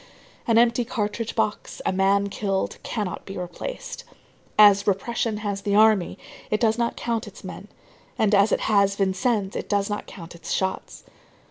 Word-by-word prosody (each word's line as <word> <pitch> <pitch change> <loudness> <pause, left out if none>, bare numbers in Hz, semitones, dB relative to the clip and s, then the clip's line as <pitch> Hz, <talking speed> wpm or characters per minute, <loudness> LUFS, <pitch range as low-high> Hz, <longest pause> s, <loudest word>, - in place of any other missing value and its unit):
An 230 -1 +4
empty 235 +1 +4
cartridge 225 -2 -3
box, 210 - -2
a - - +1
man 195 +1 +2
killed, 195 -1 -2
cannot 205 -6 -4
be 195 - -8
replaced. - - -6 0.5
As 205 -1 +7
repression 215 +2 0
has 200 -1 -2
the 200 0 0
army, 215 -4 +4 0.3
it 215 - +1
does 225 -2 +3
not 235 0 0
count 230 -2 -2
its - - -12
men, - - -8 0.5
and, 215 -1 +2
as 200 +2 +5
it - - +1
has 200 -2 +3
Vincennes, 195 +1 0
it - - -4
does 200 0 0
not 205 - -4
count 170 -3 -10
its 170 -1 -8
shots. 190 0 -2
205 Hz, 165 wpm, -24 LUFS, 195-225 Hz, 0.5 s, As